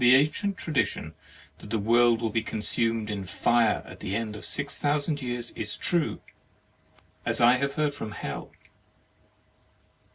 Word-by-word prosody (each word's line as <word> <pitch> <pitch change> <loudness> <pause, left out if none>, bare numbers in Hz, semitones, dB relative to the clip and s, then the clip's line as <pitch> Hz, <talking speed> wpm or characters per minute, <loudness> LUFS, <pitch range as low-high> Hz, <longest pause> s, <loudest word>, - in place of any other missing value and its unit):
The 125 +1 +8
ancient 170 +8 +1
tradition 155 -5 -1 0.5
that - - -11
the 115 - 0
world 115 +2 +4
will 110 - 0
be 115 - +1
consumed 110 0 0
in 100 -2 -3
fire 115 +4 +2
at - - -11
the 100 -1 -3
end 110 -1 -3
of 105 - -9
six 140 - -2
thousand 145 0 0
years 120 -2 -3
is 105 -1 -5
true, 170 -3 0 1.0
as - - +1
I 120 +2 +6
have 140 +1 -1
heard 150 -1 0
from 110 -7 -6
Hell. - - -5
120 Hz, 155 wpm, -27 LUFS, 110-140 Hz, 1.0 s, The